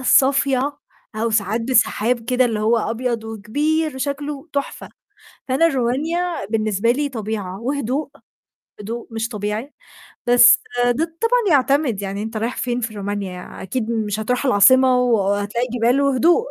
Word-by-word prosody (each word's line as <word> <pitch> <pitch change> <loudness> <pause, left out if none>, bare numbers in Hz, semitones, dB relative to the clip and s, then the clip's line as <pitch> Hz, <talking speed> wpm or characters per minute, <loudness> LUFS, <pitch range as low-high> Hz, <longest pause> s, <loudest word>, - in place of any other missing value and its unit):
الصافية 270 +1 +2 0.4
أو 230 +1 -1
ساعات 215 +1 0
بسحاب 235 -1 +1
كده 250 +2 +2
اللي 225 -3 -1
هو 220 +2 +2
أبيض 230 +1 -2
وكبير 290 +9 -1
وشكله 285 +2 -4
تحفة. 280 -1 -4 0.6
فأنا 270 +6 +3
رومانيا 310 - -1
بالنسبة 215 +1 0
لي 285 +3 -1
طبيعة 210 -6 -5
وهدوء، 275 +2 -2 0.7
هدوء 230 +3 -6
مش 225 0 -3
طبيعي، 210 +5 -4 0.5
بس 240 0 +7 0.3
ده 245 +7 +1 0.2
طبعًا 455 -7 +3
يعتمد، 270 -5 0
يعني 200 +1 -4
أنت 220 0 -5
رايح 230 +3 -3
فين 245 -1 -1
في 225 -2 -3
رومانيا؟ 200 -3 -6
أكيد 220 +4 -3
مش 215 -3 -2
هتروح 250 +5 -1
العاصمة 255 +2 +5
وهتلاقي 210 -1 0
جبال 245 +3 +2
وهدوء. 290 - +3
240 Hz, 135 wpm, -20 LUFS, 215-275 Hz, 0.7 s, بس